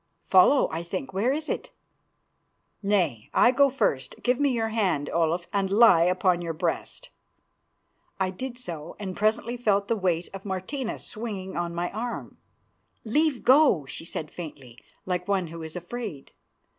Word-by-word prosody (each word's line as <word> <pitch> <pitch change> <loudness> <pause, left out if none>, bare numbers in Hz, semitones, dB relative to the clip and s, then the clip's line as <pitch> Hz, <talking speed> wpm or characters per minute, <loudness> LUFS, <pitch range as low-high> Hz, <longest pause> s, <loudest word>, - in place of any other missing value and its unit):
"Follow, 195 +9 +5
I 160 - -3
think. 190 +8 -5
Where 210 +7 +1
is 305 +2 -2
it?" - - -3 1.1
"Nay, 185 - 0
I 245 - +6
go 280 +2 +4
first. 140 - -1
Give 250 +1 +2
me 285 -1 +3
your 230 -3 0
hand, 190 -10 0
Olaf, 170 +1 +1
and 195 -1 +1
lie 200 -6 +6
upon 180 0 +2
your 165 -2 -4
breast." - - -3 1.1
I 190 -1 +1
did 245 +6 -6
so, 170 -10 -7
and 190 -3 -5
presently 220 +3 0
felt 205 -4 +1
the 230 - +3
weight 180 -4 0
of 195 0 -7
Martina 210 +6 -3
swinging 205 -4 -6
on 170 0 -2
my 175 +1 -2
arm. 235 +3 -5 0.7
"Leave 295 +4 +1
go," 260 - +5
she 150 - -6
said 155 -2 -6
faintly, 135 -8 -9 0.3
like 180 -1 -2
one 190 -4 0
who 165 0 -8
is 160 +1 -7
afraid. 180 - -6
190 Hz, 155 wpm, -26 LUFS, 170-235 Hz, 1.1 s, I